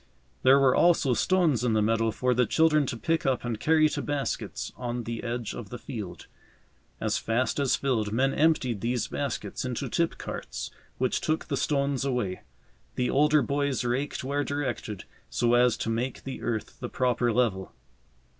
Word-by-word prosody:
There 130 +1 +6
were 135 -2 +4
also 165 -7 +4
stones 165 - +2
in 120 -3 +2
the 110 - +3
meadow 115 +1 +2
for 125 +4 +1
the 125 0 +2
children 155 -3 +3
to 120 - -3
pick 165 +7 0
up 130 -2 0
and 115 -3 -2
carry 155 +4 +4
to - - -3
baskets 145 -2 -3
on 120 -1 -4
the 115 0 -5
edge 120 -1 -3
of 105 -4 -7
the 120 - -6
field. 105 - -7 0.7
As - - 0
fast 120 +5 0
as 140 -2 +3
filled, 115 -7 0
men 135 +5 +2
emptied 135 -9 +2
these 120 0 0
baskets 125 -8 -3
into 125 +1 -3
tip 170 +7 0
carts, - - -6 0.3
which 130 -1 0
took 155 0 -1
the 145 - -2
stones 140 0 0
away. 125 -9 -1 0.5
The 125 -1 0
older 150 +1 +4
boys 140 -2 0
raked 125 +4 -2
where 140 +2 0
directed, 130 -8 -3 0.3
so 120 0 +1
as 120 -1 +4
to - - -3
make 120 +3 -2
the 135 - -6
earth 110 -2 -3
the - - -5
proper 125 -1 +1
level. 110 -5 0
125 Hz, 175 wpm, -27 LUFS, 115-140 Hz, 0.7 s, There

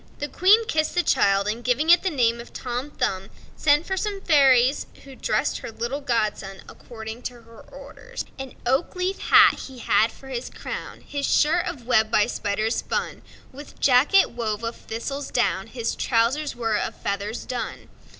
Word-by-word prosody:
The 290 - -3
Queen 400 +9 +4
kissed 310 -8 -1
the 355 - +2
child, 195 -6 +2
and, 225 +3 -3
giving 260 +7 +2
it 345 - +7
the 380 - 0
name 235 -6 +1
of 235 - -13
Tom 250 +2 -4
Thumb, 195 -9 -2 0.3
sent 295 +2 +3
for 380 - -2
some 410 +1 -2
of - - -13
the - - -22
fairies, 265 -2 +4 0.2
who 275 -1 -12
dressed - - -1
her - - -7
little 240 +6 -4
godson 215 -6 -2
according 220 0 -9
to 240 -1 -16
her 230 0 -15
orders: 275 0 -9
An 270 -1 -7
oak 265 +10 0
leaf 365 +2 -2
hat - - +6
he 265 -2 -12
had 230 -1 +2
for 270 - -14
his 250 -1 -4
crown; - - -7
His 285 -1 -3
shirt 340 +4 +3
of 300 -9 -6
web 220 -3 +3
by 210 -2 +3
spiders 215 +3 -2
spun; - - -3 0.3
With 285 +3 -12
jacket 280 +9 +4
wove 225 -2 -3
of 230 +1 -3
thistle's 275 +5 -5
down; 195 -4 0
His 230 -1 -3
trousers 260 +6 0
were 225 -3 0
of - - -3
feathers 200 +3 -4
done. 250 - -5
245 Hz, 185 wpm, -24 LUFS, 225-290 Hz, 0.3 s, it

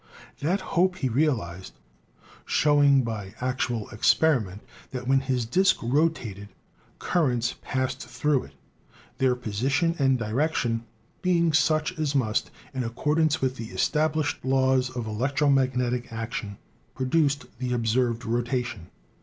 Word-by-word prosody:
That 180 +7 0
hope 180 +1 +3
he 135 -8 -1
realized, 110 - -1 0.7
show 145 -1 +3
ing 140 -2 +5
by 105 -3 -5
actual 125 -3 -2
experiment 110 - +2 0.3
that 125 -1 -6
when 135 0 +4
his 130 -3 -1
disk 185 +12 +3
rotated 120 -7 0 0.5
cur 170 -4 +1
rents 120 0 -1
passed 130 -1 -3
through 130 +3 0
it, - - -16 0.7
their 130 -2 +3
position 135 - 0
and 135 -1 +3
direction 115 0 -1 0.4
being 170 -3 +2
such 155 +1 +2
as 150 -2 -1
must, 110 -5 +1 0.2
in 130 -2 -2
accordance 150 +6 +1
with 130 0 0
the 115 - -5
established 155 +1 0
laws 130 -1 +2
of 125 -3 -5
electromagnetic 125 +1 +1
action, 115 -3 -5 0.4
produce 145 +2 +2 0.2
the 125 -1 -2
observed 120 0 0
rotation. 120 -5 -2
130 Hz, 125 wpm, -26 LUFS, 115-150 Hz, 0.7 s, ing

